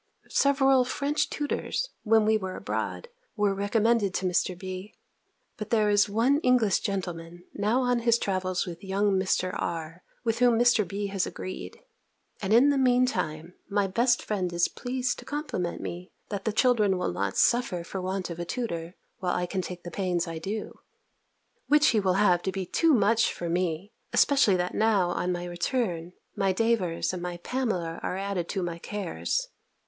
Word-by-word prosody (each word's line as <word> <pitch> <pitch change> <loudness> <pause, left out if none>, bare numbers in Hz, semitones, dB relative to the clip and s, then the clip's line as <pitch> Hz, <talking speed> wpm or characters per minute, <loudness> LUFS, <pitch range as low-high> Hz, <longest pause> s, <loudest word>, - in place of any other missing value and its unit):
Several 270 -2 +4
French 280 +4 -1
tutors, 310 +11 -2
when 220 -1 +4
we 220 +1 +4
were 190 -3 -3
abroad, 485 - -4 0.3
were 205 -2 +2
recommended 205 0 +1
to 185 - -1
Mr. 180 0 0
B. 185 +2 -7 0.6
But 215 0 -6
there 215 -2 +3
is 205 0 +4
one 240 +8 +3
English 250 - +3
gentleman, 175 -3 -4
now 215 +5 +1
on 245 -1 +2
his 235 0 +3
travels 185 -3 -1
with 175 +2 -8
young 200 +1 +1
Mr. 190 -1 +1
R. 165 +1 -4 0.2
with 230 -1 0
whom 245 -2 +4
Mr. 235 -4 +4
B. 200 +3 -3
has 195 -1 -1
agreed; 185 - -7 0.6
and 195 0 -2
in 245 +6 +6
the 285 -1 +2
mean 250 -1 +4
time, 165 - -3 0.2
my 200 -1 +1
best 235 +5 +2
friend 185 -4 -2
is 175 0 +2
pleased 250 0 -3
to - - -12
compliment 290 - -3
me, 180 +2 -6 0.2
that 200 -2 -4
the 220 - +1
children 215 -4 +3
will 180 - -1
not 95 +1 -2
suffer 235 -8 +2
for 190 +2 -5
want 185 0 -3
of 170 - -7
a - - -2
tutor, 170 -4 -4 0.2
while 180 -1 -1
I 180 - 0
can 185 +1 -2
take 180 0 -7
the 175 - -7
pains 180 -1 -1
I 165 -1 -5
do: 205 +6 -5 0.9
which 300 0 +5
he 225 - +3
will 190 -2 +1
have 180 -3 +4
to 190 - -2
be 190 -1 -3
too 325 - +3
much 225 +1 +3
for 175 - -5
me: 175 +2 -1 0.2
especially 270 -9 +4
that 180 0 -1
now, 210 -5 +2
on 180 0 -1
our 175 0 -5
return, 175 -2 -2 0.2
my 195 -1 +1
Davers 190 -6 0
and 180 - -4
my 175 0 -4
Pamela 180 -7 -2
are 185 - -3
added 195 -3 -3
to 190 -2 -2
my 170 -1 -4
cares. 210 - -3
195 Hz, 180 wpm, -27 LUFS, 180-230 Hz, 0.9 s, in